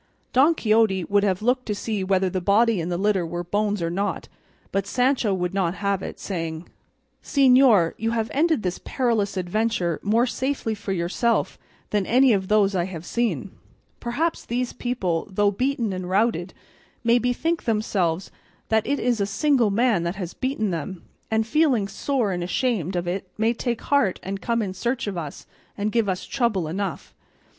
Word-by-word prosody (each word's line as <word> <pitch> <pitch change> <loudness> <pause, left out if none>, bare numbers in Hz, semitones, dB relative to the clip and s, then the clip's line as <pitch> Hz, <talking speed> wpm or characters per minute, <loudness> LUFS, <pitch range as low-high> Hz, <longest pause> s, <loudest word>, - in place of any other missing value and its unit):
Don 285 +6 +5
Quixote 215 - +2
would 200 +3 +2
have 195 0 0
looked 250 +2 +1
to 210 - -1
see 210 -1 -2
whether 190 0 +2
the 185 0 -2
body 205 +1 +3
in 165 - -3
the 175 - -1
litter 195 -1 +1
were 175 +1 -4
bones 205 +1 -1
or 165 - -1
not, 200 +4 -2 0.4
but 195 0 -1
Sancho 250 -1 +1
would 180 -1 -1
not 185 -3 0
have 200 -1 -1
it, - - -7
saying: 165 -3 -4 0.6
"Señor, 255 - +5
you 225 - 0
have 225 -1 -1
ended 315 -3 +2
this 180 -1 -2
perilous 225 -7 0
adventure 185 -2 0
more 225 +4 +2
safely 260 -2 -2
for 205 -1 -5
yourself 190 +6 0 0.3
than 205 -3 0
any 255 +1 +5
of 190 -2 0
those 205 -1 +3
I 175 -2 +1
have 175 -3 -7
seen: 235 +3 -1 0.5
perhaps 300 +8 -1
these 245 +1 -2
people, 200 -10 -2
though 205 +1 +2
beaten 240 -1 -1
and 185 -1 -5
routed, 190 -2 +1 0.5
may 235 +1 +4
bethink 285 +8 -1
themselves 195 -6 0 0.4
that 220 0 +2
it 285 +2 0
is 240 -3 +1
a 200 - +1
single 250 +1 +2
man 220 -2 +2
that 170 +2 -2
has 185 -3 -5
beaten 255 -6 -1
them, 170 +2 -5 0.3
and 220 0 +1
feeling 260 -5 +2
sore 245 -1 -1
and 175 -1 -2
ashamed 190 - -1
of 175 0 -2
it 185 +1 -3
may 225 +2 +2
take 240 -1 -3
heart 280 -10 +2
and 195 +1 -4
come 230 -1 0
in 190 -2 -4
search 240 +5 -2
of 205 -2 -3
us 155 -4 -6 0.3
and 210 +1 -1
give 230 -3 +1
us 185 -1 -2
trouble 225 - 0
enough. 190 +2 -4
205 Hz, 180 wpm, -24 LUFS, 185-240 Hz, 0.6 s, Don